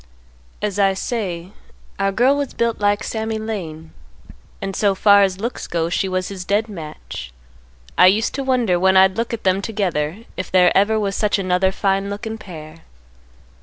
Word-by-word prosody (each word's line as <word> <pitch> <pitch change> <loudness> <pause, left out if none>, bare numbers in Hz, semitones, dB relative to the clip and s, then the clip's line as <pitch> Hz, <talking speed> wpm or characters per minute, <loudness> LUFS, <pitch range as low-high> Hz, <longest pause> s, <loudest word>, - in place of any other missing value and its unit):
"As 205 -1 -1
I 195 -1 +3
say, 190 -5 -4 0.5
our 195 0 +1
girl 250 +7 +3
was 285 -2 -3
built 235 -1 0
like 205 0 +1
Sammy 220 0 -3
Lane, 175 -8 -6 0.7
and 195 -1 -4
so 200 -2 +2
far 200 +1 +6
as 190 -1 +1
looks 235 +4 -4
go 165 -1 -1
she 190 +2 -1
was 185 0 -2
his 190 -2 -6
dead 205 +4 0
match. 150 - -8 0.7
I 180 - +9
used 210 +4 +2
to 275 - -3
wonder 245 -9 +1
when 190 +1 +4
I'd 190 0 +5
look 230 +1 -2
at 230 -1 -4
them 190 +1 +2
together 190 -3 -2
if 185 - -5
there 180 -1 +4
ever 215 +3 +3
was 200 -2 -1
such 210 -1 +1
another 185 0 +1
fine 195 0 0
lookin' 220 +2 -5
pair. 155 -5 -10
195 Hz, 175 wpm, -20 LUFS, 185-220 Hz, 0.7 s, I